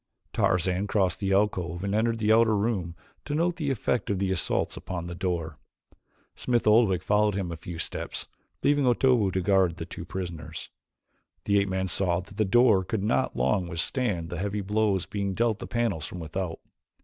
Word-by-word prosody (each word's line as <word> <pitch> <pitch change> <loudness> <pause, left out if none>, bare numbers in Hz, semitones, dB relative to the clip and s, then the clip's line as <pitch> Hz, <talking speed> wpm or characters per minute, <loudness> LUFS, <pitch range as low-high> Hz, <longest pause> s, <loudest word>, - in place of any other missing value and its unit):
Tarzan 90 +2 +1
crossed 95 -4 +1
the 100 -2 -1
alcove 95 -4 0
and 100 0 -1
entered 115 +2 +1
the 110 0 +3
outer 110 -1 +4
room 100 -6 -1 0.3
to 145 - -3
note 170 +2 +1
the 150 -5 -1
effect 125 -3 -1
of 100 - +1
the 95 0 0
assaults 95 - 0
upon 85 -2 -5
the 85 - -5
door. 85 -4 -3 0.7
Smith 120 -2 0
Oldwick 105 -5 +4
followed 105 +1 +2
him 95 -4 -2
a - - -4
few 85 +1 -8
steps, - - -5 0.4
leaving 145 -1 +3
Otobu 120 -4 +3
to 95 +1 0
guard 95 -3 +2
the 80 - -5
two 85 - -8
prisoners. 85 -3 -6 0.7
The 100 0 +3
ape 100 0 0
man 95 0 -1
saw 90 -1 +1
that 95 +2 -11
the 110 - +2
door 105 -2 +4
could 100 +1 -2
not 115 +4 +1
long 95 -5 +1
withstand 85 0 -2
the 85 - -4
heavy 100 +1 -2
blows 100 -1 +1
being 100 -2 -3
dealt 115 -1 +1
the - - -6
panels 115 -10 -1
from 90 - -7
without. 85 +1 -4
100 Hz, 185 wpm, -27 LUFS, 90-110 Hz, 0.7 s, outer